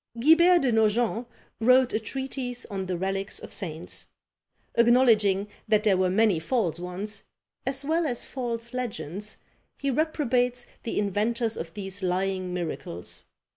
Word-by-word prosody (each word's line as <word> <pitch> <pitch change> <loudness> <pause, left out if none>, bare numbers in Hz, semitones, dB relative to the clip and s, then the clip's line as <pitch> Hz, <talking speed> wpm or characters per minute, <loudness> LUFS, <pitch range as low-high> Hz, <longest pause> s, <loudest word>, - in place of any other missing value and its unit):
Guibert 340 +6 +6
de 255 - +3
Nogent 225 +2 +2 0.3
wrote 255 +2 +5
a - - +2
treatise 255 +1 -4
on 190 -2 -3
the 180 -1 -1
relics 195 +2 -2
of - - -8
saints; 170 -4 -5 0.7
acknowledging 225 -5 +4 0.2
that 215 -1 +3
there 205 -3 +4
were 185 0 +2
many 200 -2 +3
false 175 -2 0
ones, 185 +4 -4 0.5
as 270 +1 -1
well 320 +2 +1
as 245 -4 -2
false 235 -2 -4
legends, 210 -5 -4 0.4
he 280 -1 -1
reprobates 250 -4 +1 0.2
the 230 - -4
inventors 220 +3 0
of 165 +2 -6
these 195 -1 -5
lying 185 0 -1
miracles. 160 - -5
220 Hz, 135 wpm, -27 LUFS, 190-250 Hz, 0.7 s, Guibert